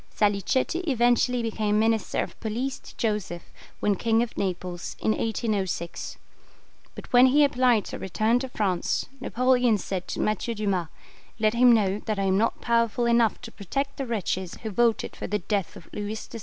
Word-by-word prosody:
Salicetti 210 - +1
eventually 245 -1 +2
became 215 -2 0
Minister 220 0 +1
of - - -10
Police 245 +4 -3
to - - -15
Joseph, 210 -6 -2 0.4
when 205 - +3
King 225 +2 +2
of 240 - -7
Naples, 180 -2 -4
in - - +1
1806; 210 -6 -2 0.8
but - - -11
when 250 +1 +8
he 290 +3 +5
applied 250 -6 +3
to - - -6
return 215 +5 +1
to 265 0 -5
France, 195 -7 -1
Napoleon 250 -2 +2
said 185 -1 -4
to - - -4
Mathieu 215 +2 -1
Dumas, 195 -5 -1 0.5
"Let 215 -1 +2
him 245 +1 +6
know 205 -3 +2
that 215 -2 -1
I 195 - 0
am 190 0 +2
not 230 - 0
powerful 235 0 +1
enough 235 -1 +3
to 235 -2 -9
protect 275 +9 -4
the 270 - -3
wretches 190 -5 -2
who 220 - -3
voted 230 +2 +1
for - - -5
the 210 - 0
death 200 -1 -2
of 165 - -12
Louis 205 +1 -3
XVI. 225 +1 -8
220 Hz, 175 wpm, -26 LUFS, 200-240 Hz, 0.8 s, when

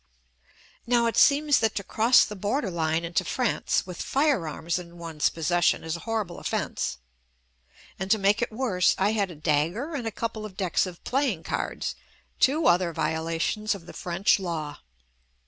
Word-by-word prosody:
Now 240 -1 +3
it 230 - 0
seems 290 0 +5
that 220 -1 +1
to 200 - -2
cross 230 +6 +4
the 210 - -7
border 205 +3 -1
line 165 0 0
into 170 -1 0
France 250 -4 0
with 180 -2 -7
fire 275 - +1
arms 165 +3 -2
in 175 -1 -11
one's 165 -3 -1
possession 175 +2 +1
is 160 0 -3
a - - -6
horrible 215 -4 -3
off - - -4
ence - - -2 0.5
— 60 +1 -27
and 190 +1 -3
to 220 - +5
make 205 +2 +2
it 240 - -1
worse 215 -6 +2
I 200 +2 +2
had 205 -3 0
a 175 - -9
dagger 155 - 0
and 250 -6 -3
a - - -2
couple 220 0 -4
of 200 -3 -9
decks 185 -1 +1
of 175 -2 -10
playing 250 - 0
cards - - -3 0.2
— - - -35
two 300 +5 +3
other 175 -1 +3
violations 165 +8 -1
of 180 -4 -11
the - - -11
French 180 +4 +1
law. 160 -5 -4
190 Hz, 185 wpm, -26 LUFS, 170-225 Hz, 0.5 s, seems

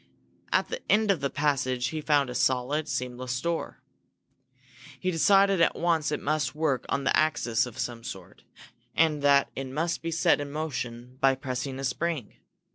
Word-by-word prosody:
At - - +2
the 480 +1 -4
end 215 0 +4
of 190 - 0
the 140 - -1
passage 130 -4 0
he 155 +2 -4
found 145 -4 +2
a - - -5
solid, 130 +5 +1
seamless 125 -1 -3
door. 170 +4 -3 1.2
He 185 - 0
decided 195 +2 +4
at 165 - +3
once 165 -3 +1
it 150 - -1
must 150 -2 -1
work 150 -5 0
on 140 - 0
an 135 - -3
axis 125 -6 +2
of 120 - -11
some 120 -1 -4
sort 95 -6 -9 0.5
and 155 -3 +3
that 140 -1 +4
it 135 0 -4
must 165 +6 -2
be 165 - -3
set 160 -2 +2
in 145 0 -6
motion 130 -5 -5
by 135 0 +4
pressing 130 0 -4
a 135 - -5
spring. 140 -1 -2
140 Hz, 175 wpm, -27 LUFS, 125-160 Hz, 1.2 s, end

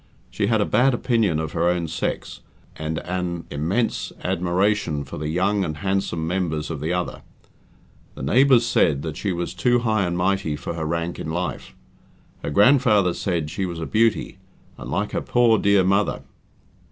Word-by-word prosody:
She 100 - -1
had 110 -1 +2
a - - +2
bad 130 +1 +3
opinion 115 - +1
of 80 -1 -3
her 85 +1 +1
own 90 -2 0
sex, 80 +2 -4 0.4
and 80 +1 -4
an 90 -1 -3
immense 85 +12 -1
admiration 90 -3 0
for 70 - -8
the 75 - -3
young 95 +5 +1
and 75 -4 -4
handsome 95 -3 -1
members 85 -3 -2
of 80 - -4
the 80 +4 -2
other. 90 0 -2 0.9
The - - -7
neighbours 125 - +4
said 75 -11 +2
that 80 -2 -4
she 100 - -2
was 85 0 -3
too 120 +6 +2
high 110 -5 +1
and 85 0 -2
mighty 90 -4 0
for 75 +3 -5
her 80 -1 -4
rank 85 +1 -2
in - - -5
life. 90 +3 -4 0.7
Her - - -3
grandfather 105 - +4
said 85 -6 -2
she 95 +2 -2
was 85 -2 -6
a 80 - -3
"beauty", 110 -2 +1 0.4
and - - -9
like 100 +8 -1
her - - -1
poor 120 -3 +3
dear 100 -1 +4
mother. 100 +2 +1
90 Hz, 175 wpm, -23 LUFS, 80-105 Hz, 0.9 s, neighbours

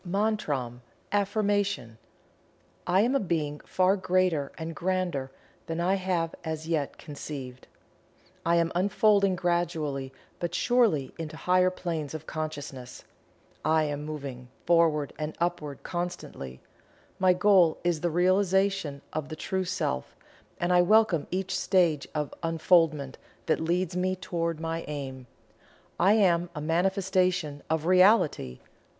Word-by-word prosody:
MANTRAM 175 - -1 0.3
(AFFIRMATION.) 200 - 0 0.9
I 185 +2 +4
Am 240 +5 +2
a 275 - +3
Being 155 - -2
far 185 +1 +2
greater 185 -6 +1
and 160 0 -5
grander 175 -7 -1 0.4
than 165 0 -3
I 180 +2 +2
have 180 -4 -1
as 160 -1 -4
yet 155 -4 -1
conceived. 140 -4 -8 0.8
I 170 +1 +2
am 170 -1 +2
unfolding 200 +1 +3
gradually 165 -6 -1 0.3
but 175 0 -3
surely 225 - +2
into 160 -1 -6
higher 185 +1 +3
planes 165 -5 -4
of 155 0 -7
consciousness. 145 -6 -6 0.6
I 155 +1 +3
am 145 -1 -3
moving 140 -5 -6 0.2
Forward 165 -4 +3
and 155 0 -3
Upward 170 -5 -2
constantly. 175 - -5 0.6
My 185 -1 +5
goal 180 -3 +4
is 175 -3 0
the 175 - +1
Realization 185 -3 +1
of 155 -1 -3
the 155 - -5
True 190 +3 -2
Self, 120 - -2 0.4
and 175 +1 +1
I 180 - +6
welcome 195 -4 +3
each 190 +1 -2
stage 170 -7 +2
of 150 -1 -2
Unfoldment 165 -4 +2 0.3
that - - +1
leads 175 +2 -1
me 185 +1 0
toward 170 -3 -3
my 165 0 -3
aim. 135 -3 -6 0.7
I 190 +4 +5
am 175 -5 +3
a - - -4
manifestation 180 -2 0
of 160 0 0
REALITY. 185 - +4
170 Hz, 130 wpm, -28 LUFS, 150-185 Hz, 0.9 s, I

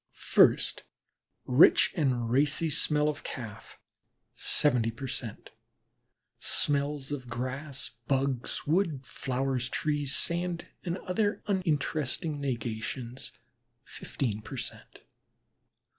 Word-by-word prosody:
First, - - +3 0.6
rich 130 +6 +6
and 125 -8 0
racy 150 +4 +3
smell 150 0 +2
of 150 -1 -2
Calf, 115 -5 -8 0.5
seventy 125 -6 +3
per 125 +4 -6
cent.; 120 -4 -5 0.9
smells 145 -1 0
of 130 -4 -4
grass, 130 +3 -4 0.2
bugs, 135 -2 -1
wood, 160 -3 +1
flowers, 130 0 -2
trees, 145 -2 +1
sand, 170 0 +1 0.2
and 175 0 -2
other 205 +3 -1
uninteresting 155 -5 -1
negations, 120 0 -4 0.5
fifteen 110 -5 -4
per 135 +5 -8
cent. 120 - -7
140 Hz, 95 wpm, -29 LUFS, 125-150 Hz, 0.9 s, rich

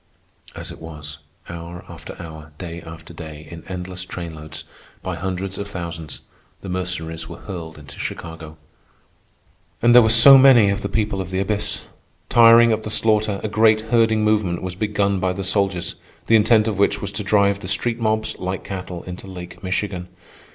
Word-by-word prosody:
As - - -6
it - - -12
was, 75 -2 -8 0.3
hour 85 +1 -8
after - - -10
hour, 80 -2 -10
day 85 -1 -7
after 80 0 -11
day, 80 -2 -9
in 85 -1 -9
endless 90 0 -6
train 85 -3 -7
loads, 75 0 -9 0.4
by - - -3
hundreds 95 +2 -4
of 100 - -4
thousands, 85 -5 -6 0.4
the 95 - -7
Mercenaries 85 -3 -4
were 85 - -8
hurled 85 -5 -7
into 70 -1 -13
Chicago. 80 -2 -7 1.2
And 120 +1 +4
there 125 - +10
were 110 - +3
so 135 +5 +9
many 125 -7 +7
of 100 +1 -2
the 100 - -3
people 105 -2 -1
of 90 - -6
the 95 - -3
abyss! 105 +1 -1 0.5
Tiring 115 0 +7
of 110 - -1
the 105 - -6
slaughter, 105 -2 +1
a - - 0
great 110 0 +4
herding 115 -2 +3
movement 105 -5 +1
was 95 -1 -4
begun 100 0 0
by 90 0 0
the 95 +1 -5
soldiers, 95 -2 0 0.3
the 115 - +4
intent 110 0 +4
of 105 -3 -2
which 100 0 +2
was 100 0 -4
to 105 +1 -4
drive 100 -1 +2
the 95 - -8
street 115 +5 0
mobs, 110 -1 0
like 95 +1 -4
cattle, 90 -3 -6
into 90 +1 -8
Lake 90 -1 -10
Michigan. 95 -1 -2
95 Hz, 180 wpm, -21 LUFS, 85-105 Hz, 1.2 s, there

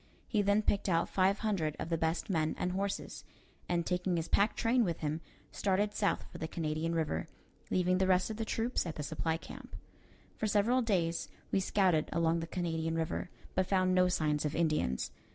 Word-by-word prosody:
He 215 - +2
then 205 +1 +3
picked 200 -1 +1
out 165 -1 +2
five 195 +1 +3
hundred 165 -8 0
of - - -4
the 165 - +1
best 160 +1 0
men 160 -5 0
and 180 - -1
horses, 195 +2 -3 0.5
and, 170 -1 +1
taking 180 0 0
his 165 - -2
pack 205 +2 +3
train 240 +2 +3
with 170 -5 -2
him, 155 +1 -2 0.3
started 205 +1 +1
south 205 -1 0
for - - -9
the 160 - -3
Canadian 160 +1 -2
River, 150 - -1 0.4
leaving 185 0 +2
the 190 - +3
rest 185 +3 +3
of 215 - -5
the 225 - -1
troops 225 -2 -1
at 160 - -4
the 150 - -4
supply 160 +2 -1
camp. - - -10 0.6
For 220 - 0
several 215 +5 +3
days 175 -7 0 0.2
we - - +3
scouted 185 -5 +2
along 165 0 +2
the 165 - -4
Canadian 165 -2 -2
River, 165 +2 -2 0.2
but 185 0 +1
found 185 -1 +2
no 185 0 +5
signs 150 -4 +1
of 150 0 -2
Indians. 155 - 0
180 Hz, 195 wpm, -33 LUFS, 160-200 Hz, 0.6 s, no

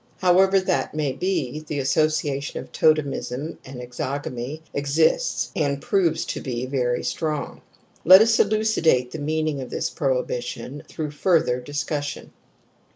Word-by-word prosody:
However 190 +1 +4
that 185 -4 -1
may 150 -3 0
be, 155 -4 -2
the 155 -1 -5
associa 145 0 +1
tion 145 - -5
of - - -10
totemism 150 -1 0
and 130 -2 -9
exogamy 130 +3 -5
exists, 155 - +1
and 140 -3 0
proves 175 +2 +1
to - - -4
be 125 -1 -3
very 125 -2 -1
strong. 155 -3 -3 0.4
Let 185 +2 +10
us 225 +1 +4
elucidate 200 - +2
the 160 - -6
meaning 155 -1 -1
of 130 - -7
this - - -2
prohibi 130 -4 -1
tion 130 +3 -7
through 155 -3 -5
further 155 -5 +2
discussion. 145 +2 -4
150 Hz, 140 wpm, -23 LUFS, 135-165 Hz, 0.4 s, Let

